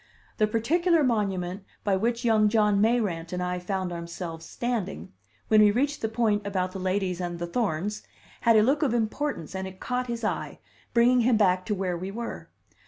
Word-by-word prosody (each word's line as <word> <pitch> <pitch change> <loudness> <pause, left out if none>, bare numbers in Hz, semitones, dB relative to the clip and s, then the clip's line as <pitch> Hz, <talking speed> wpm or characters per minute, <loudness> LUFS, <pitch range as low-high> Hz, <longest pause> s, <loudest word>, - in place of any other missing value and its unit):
The 215 - +4
particular 320 - +2
monument 195 -6 -1 0.2
by 200 -2 +2
which 235 +5 -1
young 215 -2 +4
John 210 -2 +3
Mayrant 210 -8 +1
and 180 0 -2
I 180 0 -2
found 185 0 -3
ourselves 170 -1 -6
standing, 210 - -3 0.3
when 215 -1 +6
we 210 - +7
reached 280 +7 0
the 220 - -1
point 220 -2 +1
about 185 -2 -1
the 190 - -6
ladies 185 -1 -1
and 175 -1 -3
the 175 - -3
thorns, 205 +1 -2 0.4
had 230 -1 +4
a 215 - +6
look 275 +6 +2
of 265 -6 +2
importance 230 - -2
and 190 0 -4
it 190 0 -11
caught 250 0 -2
his 235 -1 -4
eye, 215 - -2 0.3
bringing 245 +1 +4
him 235 -1 +3
back 185 -3 +2
to 210 - 0
where 185 -2 -1
we 185 +2 -4
were. 235 +4 -6
210 Hz, 190 wpm, -27 LUFS, 185-235 Hz, 0.4 s, we